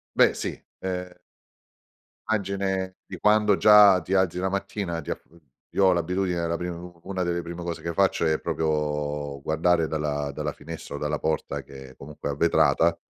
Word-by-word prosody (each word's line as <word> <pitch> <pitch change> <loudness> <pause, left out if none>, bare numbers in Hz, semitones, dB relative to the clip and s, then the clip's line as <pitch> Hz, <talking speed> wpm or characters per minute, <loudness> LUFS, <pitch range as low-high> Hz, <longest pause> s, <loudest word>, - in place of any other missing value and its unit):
Beh - - +5
sì, - - -4 0.2
ehm 90 -1 -5 1.1
Immagine 95 -3 -1
di 90 - -8
quando 105 0 +4
già 105 -3 +7
ti 90 +4 -3
alzi 95 -2 +2
la 95 +1 0
mattina 95 -3 -3
ti 75 - -8
af - - -3
uhm, 85 - -20 0.3
io 100 - +3
ho 95 - +6
l'abitudine 90 0 0
la 85 0 -1
pri 90 +1 -4
u 85 0 -8
una 95 -1 -3
delle 85 -1 -1
prime 85 +1 -7
cose 85 -1 -5
che 85 - -3
faccio 95 -1 +2
è 80 -1 +1
proprio 75 -2 -2
guardare 80 +2 +2
dalla 75 -2 -2
dalla - - -3
finestra - - -8
o - - -6
dalla 75 +1 -1
porta, 80 -1 -2
che 65 -1 -12
comunque 75 +1 -7
è - - -1
a 70 - -6
vetrata, 85 +1 +3
85 Hz, 185 wpm, -25 LUFS, 80-95 Hz, 1.1 s, già